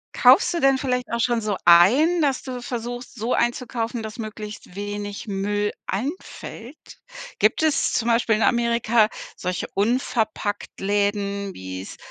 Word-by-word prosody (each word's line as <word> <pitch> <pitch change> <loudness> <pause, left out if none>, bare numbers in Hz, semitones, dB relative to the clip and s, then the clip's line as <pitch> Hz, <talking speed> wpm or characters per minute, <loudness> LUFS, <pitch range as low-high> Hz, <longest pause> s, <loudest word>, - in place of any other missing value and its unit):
Kaufst - - +6
du 340 - -1
denn 270 0 +4
vielleicht 250 -2 -2
auch 235 - -1
schon 235 -1 +1
so 210 -3 -1
ein, 245 - +6
dass 275 -3 +1
du 250 -2 -6
versuchst, 245 +1 -6
so 235 +1 -1
einzukaufen, 240 -1 -1
dass 220 0 -7
möglichst 215 -4 -8
wenig 205 +1 -5
Müll 205 +1 -1 0.2
anfällt? 255 - -6 0.4
Gibt 215 +8 +2
es 310 -2 +2
zum 230 - 0
Beispiel 230 -1 +3
in 215 - -2
Amerika 235 -2 +3 0.3
solche 180 0 -3
Unverpacktläden, 205 -3 -1
wie 95 - -7
es - - -10
225 Hz, 140 wpm, -23 LUFS, 205-245 Hz, 0.4 s, Kaufst